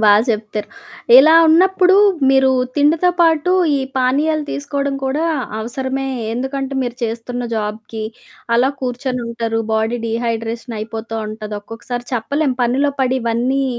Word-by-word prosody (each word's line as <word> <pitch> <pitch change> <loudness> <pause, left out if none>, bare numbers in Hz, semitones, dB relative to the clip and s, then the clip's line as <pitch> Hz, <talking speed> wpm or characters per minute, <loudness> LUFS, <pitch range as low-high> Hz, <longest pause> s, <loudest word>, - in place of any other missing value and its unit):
బా 210 - +7 0.2
చెప్తారు. 210 -2 -2 0.5
ఇలా 310 +5 +8 0.2
ఉన్నప్పుడు 370 +3 +4 0.3
మీరు 265 0 +4 0.3
తిండితో 305 +5 +3
పాటు, 330 0 +3 0.3
ఈ - - -2 0.2
పానీయాలు 295 +4 +1
తీసుకోవడం 280 -1 -2
కూడా 280 +5 -1 0.3
అవసరమే. 260 +4 -3 0.3
ఎందుకంటే 265 +2 -3
మీరు 245 -1 -4
చేస్తున్న 235 +2 -3
జాబ్‌కి 215 +1 -4 0.5
అలా 255 +3 +3
కూర్చొనుంటారు. 240 -3 -3
బాడీ 220 +2 0
డీహైడ్రేషన్ 230 0 -3
అయిపోతూ 225 +1 -5
ఉంటది. 215 0 -7
ఒక్కొక్కసారి 235 +3 -7
చెప్పలేం. 270 +4 0
పనిలో 270 +4 +1
పడి 260 0 +1
ఇవన్నీ 245 +4 0
250 Hz, 120 wpm, -18 LUFS, 225-280 Hz, 0.5 s, ఇలా